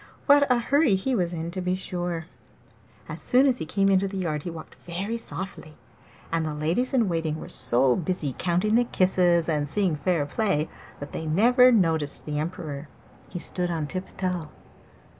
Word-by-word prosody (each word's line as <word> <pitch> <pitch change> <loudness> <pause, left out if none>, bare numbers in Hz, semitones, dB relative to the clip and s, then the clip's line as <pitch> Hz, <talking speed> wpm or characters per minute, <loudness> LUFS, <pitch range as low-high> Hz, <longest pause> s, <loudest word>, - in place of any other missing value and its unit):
What 285 -2 +5
a 250 - +5
hurry 275 -1 +3
he 255 +8 -1
was 180 -7 0
in, 165 0 -4
to 185 +1 -4
be 180 0 0
sure! 175 -3 -4 0.8
As - - -5
soon 255 +2 +4
as 255 -3 +2
he 160 - -5
came 195 +4 +1
into 195 0 +3
the 195 0 -6
yard 155 -5 -2
he 175 - -5
walked 165 -2 -9
very 195 +6 -3
softly, 190 -8 -6 0.6
and 165 0 0
the 155 -1 -3
ladies 165 +12 0
in 245 -6 +2
waiting 165 -3 -1
were - - -8
so 125 +1 +4
busy 165 -5 -2
counting 180 +5 0
the 240 +2 +5
kisses 180 -6 +2
and 150 -3 -1
seeing 185 +1 +1
fair 155 0 0
play 155 -1 -1 0.3
that 145 - -8
they 160 - -5
never 245 +10 +5
noticed 165 -9 +1
the 150 -1 -3
Emperor. 155 -3 -5 0.4
He 180 - -6
stood 180 0 0
on 165 -3 -2
tiptoe. 180 -1 -4
175 Hz, 180 wpm, -25 LUFS, 155-195 Hz, 0.8 s, What